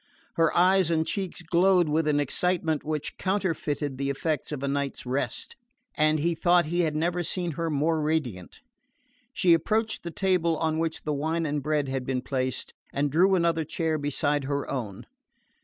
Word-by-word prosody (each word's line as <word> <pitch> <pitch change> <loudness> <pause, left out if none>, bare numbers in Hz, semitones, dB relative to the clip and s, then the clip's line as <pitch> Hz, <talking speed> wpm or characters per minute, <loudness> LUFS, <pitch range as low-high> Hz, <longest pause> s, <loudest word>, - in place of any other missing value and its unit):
Her 165 -1 +3
eyes 185 0 +4
and 160 -1 +1
cheeks 190 -2 -4
glowed 175 +1 +3
with 155 +1 +1
an 145 -1 +2
excitement 160 +1 0
which 155 -1 -4
counterfeited 160 -8 -1
the 140 0 -1
effects 150 +2 -2
of 145 -2 -4
a - - 0
night's 140 -1 -2
rest, 125 -1 -3 0.4
and 155 0 +3
he 170 +3 +1
thought 175 +1 +3
he 170 +3 -2
had 160 -3 +1
never 170 +3 0
seen 175 0 -2
her 165 +2 -2
more 155 +2 +1
radiant. 145 - -2 0.7
She 175 -2 +4
approached 215 +7 0
the 170 - -5
table 170 -3 +1
on 160 0 0
which 165 -1 -2
the 150 - -1
wine 160 +3 -1
and 145 -1 -1
bread 150 0 0
had 135 -1 -2
been 130 -1 -1
placed, 130 -2 -3 0.2
and 145 0 0
drew 185 +6 +4
another 170 -2 +1
chair 160 0 -1
beside 145 0 0
her 140 0 -2
own. 110 -8 -5
155 Hz, 175 wpm, -27 LUFS, 145-170 Hz, 0.7 s, eyes